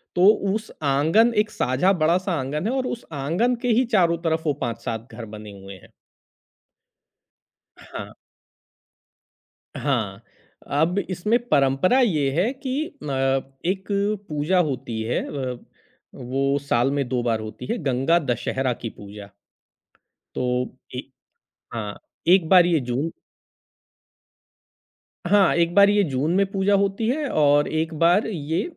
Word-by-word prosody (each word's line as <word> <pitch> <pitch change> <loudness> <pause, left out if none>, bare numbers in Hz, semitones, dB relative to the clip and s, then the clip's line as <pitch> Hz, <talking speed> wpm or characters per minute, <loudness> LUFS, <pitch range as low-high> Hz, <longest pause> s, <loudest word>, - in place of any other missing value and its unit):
तो 180 +2 +5 0.3
उस 220 0 -5
आँगन 160 +12 +3
एक 210 0 +2
साझा 130 +10 +1
बड़ा-सा 180 +3 +1
आँगन 145 +7 -3
है, - - 0
और 260 -1 -1
उस 235 - -5
आँगन 170 - 0
के 245 - -2
ही 240 +2 +3
चारों 170 -4 +4
तरफ 160 -1 0
वो 150 - +2
5-7 115 -1 -4
घर 115 0 -8
बने 105 -1 -9
हुए 95 0 -10
हैं। - - -19 1.9
हाँ। - - -9 1.6
हाँ, - - -2 0.5
अब 160 +7 +1
इसमें 210 +6 +1
परंपरा 140 - +3
ये 155 - +2
है 230 +7 +1
कि 285 +3 -4
न 150 - -5 0.6
एक 190 0 -3 0.4
पूजा 155 +5 +1
होती 125 -8 -2
है 115 - -1
अ, 130 -3 -4 0.6
वो 135 +2 -1
साल 135 -2 +1
में 140 -2 -1
2 125 -1 0
बार 115 -2 0
होती 110 0 -8
है, 235 - -1
गंगा 135 +5 +2
दशहरा 130 -2 -1
की 115 - -6
पूजा। 100 -1 -11 1.1
तो 125 - -1 0.5
ए - - -3 0.8
हाँ, 105 -3 -5 0.3
एक 175 -3 +5
बार 180 -2 +7
ये 170 -3 +2
जून 130 +6 -2 2.2
हाँ, 195 0 +4
एक 170 0 +1
बार 200 0 +7
ये 205 0 +3
जून 140 +6 0
में 195 +1 +3
पूजा 195 +1 +1
होती 200 +3 -1
है 295 +2 -1
और 145 -1 +3
एक 160 +1 -2
बार 175 +5 +4
ये 160 -5 -2
160 Hz, 140 wpm, -23 LUFS, 130-195 Hz, 2.2 s, बार